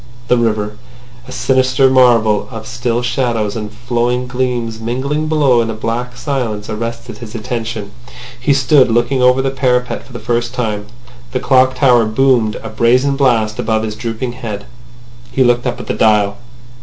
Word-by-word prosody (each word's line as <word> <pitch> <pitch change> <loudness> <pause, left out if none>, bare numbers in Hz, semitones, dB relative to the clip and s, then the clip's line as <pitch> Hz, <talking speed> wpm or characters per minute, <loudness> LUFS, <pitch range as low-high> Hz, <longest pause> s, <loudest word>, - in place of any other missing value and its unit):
The 125 - +4
river, 105 -2 -1 0.5
a - - -9
sinister 130 +1 +2
marvel 120 -5 +4
of 110 -3 -8
still 120 0 -2
shadows 120 -4 -1
and 105 -2 -5
flowing 120 +2 -1
gleams 125 -3 -2
mingling 135 +7 -2
below 145 -6 +3
in 115 - -2
a 110 - -3
black 120 +3 -4
silence, 115 -7 -3
arrested 115 +1 -5
his 115 -1 -9
attention. 115 -3 -4 0.5
He 130 +4 +1
stood 135 -1 +4
looking 120 +3 +1
over 125 +1 +4
the 135 - 0
parapet 125 -2 0
for 120 0 -10
a - - -9
long 120 - +2
time. 110 -5 -3 0.5
The 130 - 0
clock 130 0 +3
tower 125 -3 +4
boomed 115 -1 +2
a 110 - -5
brazen 125 +5 +2
blast 115 -6 +1
above 110 0 0
his 110 -1 -4
drooping 115 +2 -4
head. 110 -5 -6 0.7
He 135 - +2
looked 120 0 +2
up 120 - -3
at - - -7
the - - -2
dial. 105 -2 +2
120 Hz, 170 wpm, -16 LUFS, 110-130 Hz, 0.7 s, The